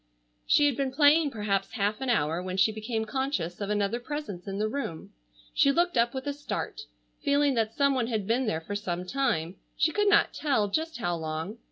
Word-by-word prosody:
She 295 Hz, -, +5 dB
had 285 Hz, -3 st, +2 dB
been 270 Hz, 0 st, -1 dB
playing 295 Hz, +2 st, +5 dB
perhaps 210 Hz, -5 st, -2 dB
half 210 Hz, +2 st, -1 dB
an 265 Hz, -, -2 dB
hour 165 Hz, -6 st, +1 dB
when 185 Hz, 0 st, -4 dB
she 200 Hz, +3 st, +4 dB
became 220 Hz, +1 st, -3 dB
conscious 215 Hz, -, -2 dB
of 200 Hz, -, -2 dB
another 210 Hz, +2 st, 0 dB
presence 245 Hz, -9 st, -6 dB
in 195 Hz, 0 st, -3 dB
the 215 Hz, +1 st, 0 dB
room. 215 Hz, -, -5 dB, 0.4 s
She 280 Hz, -, +4 dB
looked 345 Hz, +3 st, +1 dB
up 235 Hz, 0 st, +3 dB
with 265 Hz, +1 st, -4 dB
a 285 Hz, -, -1 dB
start, 290 Hz, +8 st, -4 dB, 0.4 s
feeling 285 Hz, -1 st, +3 dB
that 225 Hz, -2 st, 0 dB
some 280 Hz, -1 st, +3 dB
one 250 Hz, -3 st, 0 dB
had 220 Hz, -4 st, -2 dB
been 240 Hz, +4 st, +1 dB
there 160 Hz, -6 st, -1 dB
for 205 Hz, +5 st, -5 dB
some 180 Hz, -3 st, -3 dB
time, 190 Hz, -8 st, -1 dB, 0.2 s
she 315 Hz, +1 st, +3 dB
could 415 Hz, +4 st, +2 dB
not 415 Hz, -, +4 dB
tell 255 Hz, -9 st, +1 dB
just 320 Hz, +8 st, -2 dB
how 175 Hz, -7 st, -1 dB
long. 160 Hz, +7 st, -4 dB
230 Hz, 210 wpm, -28 LUFS, 195-280 Hz, 0.4 s, She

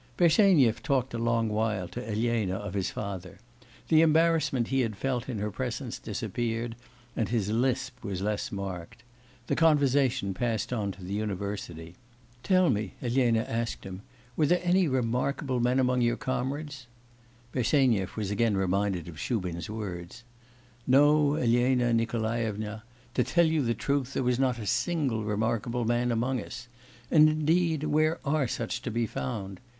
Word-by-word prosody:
Bersenyev 170 Hz, -, +4 dB
talked 135 Hz, -3 st, 0 dB
a 115 Hz, -, -2 dB
long 115 Hz, -1 st, +1 dB
while 105 Hz, -3 st, -1 dB
to 125 Hz, -, -6 dB
Elena 110 Hz, -3 st, 0 dB
of 100 Hz, -2 st, -5 dB
his 95 Hz, -2 st, -1 dB
father. 95 Hz, -3 st, -6 dB, 0.5 s
The 160 Hz, -1 st, +6 dB
embarrassment 155 Hz, -6 st, +3 dB
he 135 Hz, -, +1 dB
had 115 Hz, -4 st, -1 dB
felt 130 Hz, +1 st, -2 dB
in 120 Hz, -, -3 dB
her 105 Hz, +1 st, -2 dB
presence 125 Hz, +2 st, -4 dB
disappeared, 115 Hz, +2 st, -3 dB, 0.4 s
and 115 Hz, -, -1 dB
his 105 Hz, -4 st, 0 dB
lisp 130 Hz, +2 st, -1 dB
was 100 Hz, -3 st, -3 dB
less 105 Hz, +4 st, -2 dB
marked. 100 Hz, 0 st, -6 dB, 0.4 s
The -, -, 0 dB
conversation 140 Hz, -9 st, +3 dB
passed 115 Hz, +2 st, -2 dB
on 105 Hz, -4 st, -1 dB
to 95 Hz, -, -13 dB
the 95 Hz, +2 st, -5 dB
university. 100 Hz, -5 st, -4 dB, 0.5 s
'Tell 185 Hz, -1 st, +3 dB
me,' 105 Hz, -3 st, -2 dB
Elena 120 Hz, -2 st, +2 dB
asked 115 Hz, +1 st, -3 dB
him, 95 Hz, 0 st, -8 dB, 0.3 s
'were 150 Hz, -, +2 dB
there 175 Hz, +4 st, +3 dB
any 180 Hz, 0 st, +3 dB
remarkable 130 Hz, +1 st, 0 dB
men 125 Hz, +2 st, +2 dB
among 125 Hz, -1 st, +2 dB
your 120 Hz, 0 st, +2 dB
comrades?' 135 Hz, +1 st, -4 dB, 0.6 s
Bersenyev 120 Hz, -7 st, +1 dB
was 105 Hz, -2 st, -2 dB
again 105 Hz, 0 st, +1 dB
reminded 95 Hz, -2 st, 0 dB
of 80 Hz, -3 st, -9 dB
Shubin's 90 Hz, -8 st, -3 dB
words. 100 Hz, 0 st, -6 dB, 0.6 s
'No, 145 Hz, +2 st, +5 dB
Elena 120 Hz, -2 st, +2 dB
Nikolaevna, 110 Hz, -2 st, -1 dB, 0.3 s
to 125 Hz, -, +2 dB
tell 170 Hz, +5 st, +3 dB
you 160 Hz, -1 st, +2 dB
the 115 Hz, -3 st, 0 dB
truth, 140 Hz, +2 st, -1 dB
there -, -, 0 dB
was 125 Hz, 0 st, +1 dB
not 130 Hz, -3 st, +1 dB
a 110 Hz, -, -6 dB
single 130 Hz, -, 0 dB
remarkable 115 Hz, +3 st, -1 dB
man 120 Hz, +1 st, +1 dB
among 120 Hz, +2 st, 0 dB
us. 120 Hz, +4 st, -9 dB, 0.4 s
And, 155 Hz, -1 st, +7 dB
indeed, 155 Hz, 0 st, +1 dB
where 155 Hz, +2 st, +2 dB
are 145 Hz, -2 st, +1 dB
such 120 Hz, +1 st, -3 dB
to 125 Hz, -, -4 dB
be 115 Hz, +1 st, 0 dB
found! 95 Hz, +4 st, -5 dB
120 Hz, 155 wpm, -28 LUFS, 105-135 Hz, 0.6 s, And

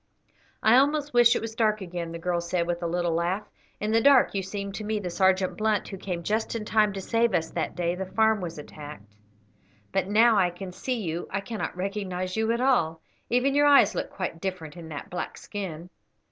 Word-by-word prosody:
"I 220 Hz, +3 st, +6 dB
almost 290 Hz, +1 st, +2 dB
wish 240 Hz, 0 st, +6 dB
it -, -, -2 dB
was 225 Hz, 0 st, -5 dB
dark 215 Hz, -2 st, +1 dB
again," 175 Hz, -3 st, -5 dB
the 170 Hz, -, -5 dB
girl 175 Hz, 0 st, -1 dB
said, 170 Hz, 0 st, -1 dB
with 175 Hz, 0 st, -2 dB
a 170 Hz, -, -1 dB
little 175 Hz, 0 st, 0 dB
laugh; 175 Hz, +5 st, -1 dB, 0.3 s
"in 210 Hz, +1 st, -1 dB
the 225 Hz, +1 st, +4 dB
dark 275 Hz, 0 st, +5 dB
you 195 Hz, -, 0 dB
seem 200 Hz, +1 st, -5 dB
to 215 Hz, -, -6 dB
me 215 Hz, +1 st, -1 dB
the 185 Hz, -4 st, -4 dB
Sergeant 190 Hz, 0 st, +2 dB
Blunt 215 Hz, -2 st, 0 dB
who 195 Hz, -, -6 dB
came 180 Hz, -2 st, -4 dB
just 220 Hz, +5 st, -1 dB
in 220 Hz, -2 st, -3 dB
time 215 Hz, -1 st, +3 dB
to 195 Hz, -, -5 dB
save 230 Hz, +1 st, +1 dB
us 165 Hz, -1 st, -1 dB
that -, -, -3 dB
day 175 Hz, -1 st, 0 dB
the 190 Hz, +1 st, -5 dB
farm 220 Hz, +1 st, +2 dB
was 170 Hz, -3 st, -5 dB
attacked; 145 Hz, -8 st, -10 dB, 0.8 s
but 195 Hz, -1 st, 0 dB
now 220 Hz, +2 st, +5 dB
I 180 Hz, -2 st, +3 dB
can 180 Hz, +1 st, -8 dB
see 250 Hz, +7 st, -3 dB
you 170 Hz, -4 st, -3 dB
I 195 Hz, -, -2 dB
cannot 210 Hz, -3 st, -5 dB
recognise 185 Hz, -1 st, -3 dB
you 220 Hz, +1 st, +1 dB
at 235 Hz, +1 st, 0 dB
all; 240 Hz, -12 st, +2 dB, 0.3 s
even 250 Hz, +3 st, +2 dB
your 290 Hz, +1 st, +4 dB
eyes 275 Hz, -8 st, +6 dB
look -, -, -3 dB
quite 175 Hz, -3 st, -5 dB
different 180 Hz, -5 st, -5 dB
in 165 Hz, -2 st, -9 dB
that 155 Hz, +6 st, -7 dB
black 180 Hz, -, -4 dB
skin." 180 Hz, -5 st, -7 dB
195 Hz, 220 wpm, -26 LUFS, 175-220 Hz, 0.8 s, I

